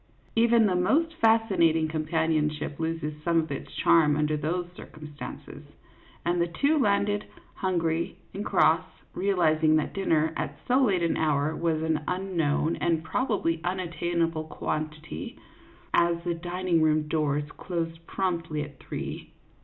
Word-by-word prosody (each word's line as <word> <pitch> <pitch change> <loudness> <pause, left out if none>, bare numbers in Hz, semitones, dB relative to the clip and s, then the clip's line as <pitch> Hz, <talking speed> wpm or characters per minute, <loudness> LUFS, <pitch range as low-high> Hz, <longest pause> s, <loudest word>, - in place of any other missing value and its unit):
Even 230 0 +5
the 195 - +2
most 310 - +2
fascinating 195 -8 +3
com 155 0 -3
panionship 155 -2 0
loses 160 -2 -3
some 170 +1 +2
of 160 -2 -3
its 140 - -5
charm 155 -3 +4
under 150 0 +1
these 170 +4 -1
cir - - -10
cumstances, 150 -1 -9 0.6
and 175 0 +1
the 170 - +2
two 285 - +1
landed, 205 -3 +1 0.3
hungry 170 -3 -1 0.2
and 200 - -4
cross, - - +3 0.3
realizing 160 -5 +2
that 155 - 0
dinner 160 -5 +1
at - - -4
so 255 +2 +4
late 190 -7 +2
an 170 - +1
hour 150 0 +1
was 160 -2 0
an 160 -1 0
un 185 +1 -3
known 155 0 +1
and 165 -2 0
probably 170 -5 -1
unattainable 170 -2 -1
quantity, 155 0 -5 0.6
as 170 0 +3
the 175 -1 0
dining 175 0 -1
room 155 -1 +2
doors 150 -2 0
closed 165 -2 -4
promptly 165 -5 -2
at 145 -2 -11
three. - - -6
165 Hz, 145 wpm, -27 LUFS, 155-180 Hz, 0.6 s, Even